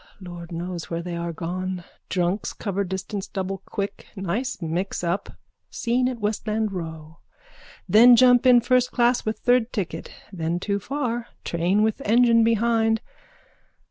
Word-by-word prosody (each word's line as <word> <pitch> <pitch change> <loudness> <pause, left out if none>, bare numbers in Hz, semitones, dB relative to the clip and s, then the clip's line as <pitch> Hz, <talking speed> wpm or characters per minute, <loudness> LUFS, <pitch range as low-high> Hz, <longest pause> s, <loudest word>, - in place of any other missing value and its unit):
Lord 175 -2 -9
knows 175 0 -5
where 170 0 -3
they 175 -1 -5
are 170 0 -3
gone. 180 +2 -4 0.3
Drunks 180 +2 -1
cover 200 -1 -2
distance 190 +2 -4
double 195 0 -4
quick. 200 -2 -5
Nice 205 +8 -2
mixup. 175 +2 -3 0.3
Scene 245 +2 0
at 250 -2 -5
Westland 215 0 -1
row. 160 -3 -7 0.7
Then 230 +6 +8
jump 245 +1 +5
in 245 -1 +7
first 250 +1 +2
class 240 -1 +2
with 215 - -1
third 245 -1 +2
ticket. 175 -7 -4 0.2
Then 170 -1 -2
too 200 +2 -1
far. 240 0 -3 0.2
Train 175 +5 +1
with 220 +4 0
engine 230 0 +4
behind. 225 0 +2
200 Hz, 140 wpm, -24 LUFS, 175-235 Hz, 0.7 s, Then